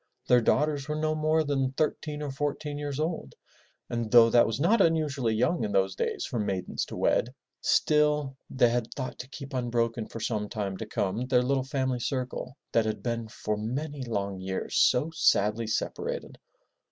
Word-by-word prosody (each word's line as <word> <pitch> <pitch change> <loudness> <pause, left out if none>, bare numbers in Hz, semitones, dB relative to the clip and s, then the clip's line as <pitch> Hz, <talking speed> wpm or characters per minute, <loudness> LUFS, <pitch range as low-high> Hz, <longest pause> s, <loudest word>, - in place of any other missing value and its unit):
Their 125 -1 +5
daughters 145 +3 +1
were 150 - -2
no 155 0 0
more 155 +1 +2
than 135 -3 0
thirteen 150 0 -2
or 145 - -3
fourteen 145 +1 -3
years 145 -1 -4
old 155 - -3 0.5
and 120 -2 -2
though 115 0 +7
that 120 0 +6
was 115 +2 -2
not 200 +8 +4
unusually 150 -9 +2
young 125 +10 +1
in 105 - -2
those 95 0 +2
days - - -2
for 120 - -3
maidens 95 -3 -2
to - - -8
wed, 125 +3 +1 0.3
still 150 -2 +2
they 125 -2 +3
had 120 -1 -1
thought 130 -3 -5
to 125 - -7
keep 140 -1 -9
unbroken 120 -2 -1
for 115 - -8
some 105 -2 -2
time 100 -3 -3
to 110 - -6
come 105 +5 -1
their 125 -1 +3
little 135 +1 +1
family 130 -2 -1
circle 130 +1 -3
that 115 -1 +3
had 110 - -3
been 115 -2 -2
for 105 0 -3
many 140 +7 -3
long 100 -5 -3
years 95 0 -4
so 145 +6 +4
sadly 110 -7 +2
separated. 110 - -3
125 Hz, 180 wpm, -28 LUFS, 115-145 Hz, 0.5 s, though